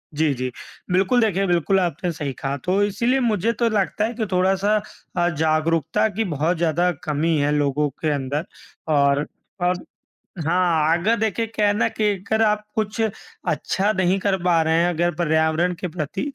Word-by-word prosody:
जी, 155 -1 +2
जी। 130 0 -3 0.4
बिल्कुल, 190 +7 +3
देखिए, 195 -3 +1
बिल्कुल 175 +2 +2
आपने 175 0 -1
सही 145 -4 -4
कहा। 135 +2 -3
तो 190 +3 +1
इसीलिए 235 +6 +1
मुझे 225 -3 +1
तो 235 - +3
लगता 210 0 0
है 230 - -3
कि 230 -2 -2
थोड़ा-सा 190 +3 +2 0.4
अ, 175 0 +3
जागरूकता 160 +4 +1
की 225 - +1
बहुत 165 -1 -1
ज़्यादा 170 +2 +1
कमी 155 +2 0
है 145 0 +1
लोगों 145 +1 +1
के 155 +3 -3
अंदर। 145 +3 -2 0.4
और, 140 -1 +3 0.4
और 180 0 0 0.6
हाँ, 165 -2 +2
अगर 210 +7 +2
देखिए 220 +1 0
क्या 215 -1 -1
है 205 - +3
ना - - +2
कि 220 - -3
अगर 200 +3 -2
आप 210 -1 +1
कुछ 215 0 -2 0.5
अच्छा 200 +2 0
नहीं 185 -1 +2
कर 195 0 +1
पा 175 -2 +3
रहे 160 0 +1
हैं 175 - +2
अगर 175 0 0
पर्यावरण 160 +1 +1
के 180 - -3
प्रति, 160 +1 -4
175 Hz, 175 wpm, -22 LUFS, 155-205 Hz, 0.6 s, बिल्कुल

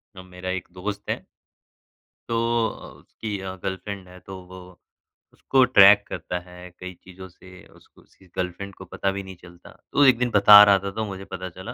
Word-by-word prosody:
ना 95 - -11
मेरा 90 0 -9
एक 95 -2 -4
दोस्त 100 +3 -6
है - - -3 1.0
तो 115 - -1 0.3
अ, - - -9
उसकी 105 -3 -7
अ, 95 0 -6
गर्लफ्रेंड 95 0 -6
है, 90 0 -14
तो 95 -1 -10
वो 95 0 -11 0.7
उसको 135 -1 +2
ट्रैक 100 -4 +7
करता 90 - -5
है 90 0 -13
कई 90 0 -8
चीज़ों 95 0 -12
से, 90 +1 -16
उसको - - -23
उसकी 95 - -24
गर्लफ्रेंड 95 +2 -4
को 95 - -12
पता 95 +2 -3
भी 100 0 -6
नहीं 95 -1 -11
चलता। 85 -1 -16 0.2
तो 145 - +4
एक 130 -3 +5
दिन 125 0 -1
बता 105 0 +9
रहा 100 -2 +5
था 100 0 -5
तो 110 +2 -4
मुझे 95 -1 -8
पता 95 -1 -7
चला, 95 +8 -9
95 Hz, 195 wpm, -23 LUFS, 90-100 Hz, 1.0 s, बता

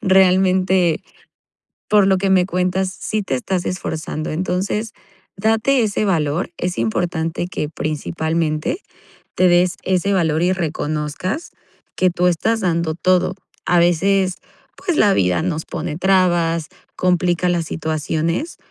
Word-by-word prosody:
Realmente, 185 -3 +3 0.9
por 205 -2 +5
lo 190 -1 +4
que 195 0 0
me 185 -2 +4
cuentas, 185 +1 -1
sí 215 -1 -2
te 155 - -2
estás 180 +7 -2
esforzando. 160 -3 -4
Entonces, 190 +6 -2 0.4
date 225 +5 +2
ese 210 -1 0
valor, 165 -2 0
es 180 -5 -3
importante 165 +8 -1
que, 150 - -3
principalmente, 160 - -2 0.6
te 185 - +4
des 175 0 +3
ese 190 +1 +1
valor 160 -4 +1
y 180 - +3
reconozcas 160 - -3 0.4
que 185 - +3
tú 180 +1 +1
estás 220 +6 +1
dando 170 -4 0
todo. 185 +1 +2 0.3
A 175 -1 +3
veces, 185 +2 +2 0.4
pues, 350 -4 -2
la 205 -2 +5
vida 90 - +2
nos 160 -1 -2
pone 155 -1 -4
trabas, 175 -3 +2 0.3
complica 180 -1 +1
las 170 -2 0
situaciones, 160 - -2
180 Hz, 130 wpm, -19 LUFS, 160-190 Hz, 0.9 s, por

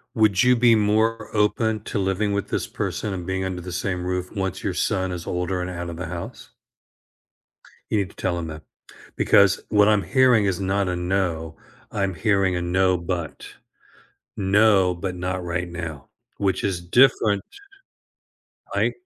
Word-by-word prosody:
Would 110 -2 +3
you 125 0 +5
be 120 -1 +5
more 110 +1 +1
open 110 +1 +1
to 105 - -3
living 95 +2 0
with 100 0 -2
this - - -2
person 105 -3 -3
and 90 -1 -6
being 95 0 -1
under 95 -1 -4
the 90 0 -7
same 90 0 -2
roof 90 0 -3
once 95 -3 -3
your 95 - -1
son 95 0 0
is 90 -1 -6
older 90 +1 -2
and 90 - -4
out 85 -1 -5
of 85 - -7
the 90 0 -5
house? 85 0 -7 1.4
You - - +1
need 100 -3 0
to - - -23
tell 90 -2 -2
him 85 -1 -4
that 80 0 -8 0.5
because 100 -1 +4
what 105 -1 +4
I'm 105 -2 +3
hearing 130 -5 +4
is 95 -2 0
not 95 0 0
a 90 - -1
no. 90 -3 -2 0.3
I'm 100 -2 -1
hearing 95 +1 +1
a 90 - -1
no, 90 +1 +2
but. 85 -1 -4 0.9
No, 100 -2 +4
but 90 +1 -4
not 90 +1 -3
right 85 0 -3
now, 80 -4 -7 0.3
which 95 -2 0
is 95 -3 -1
different. 105 +1 +3 1.3
I - - +2
95 Hz, 170 wpm, -23 LUFS, 90-105 Hz, 1.4 s, you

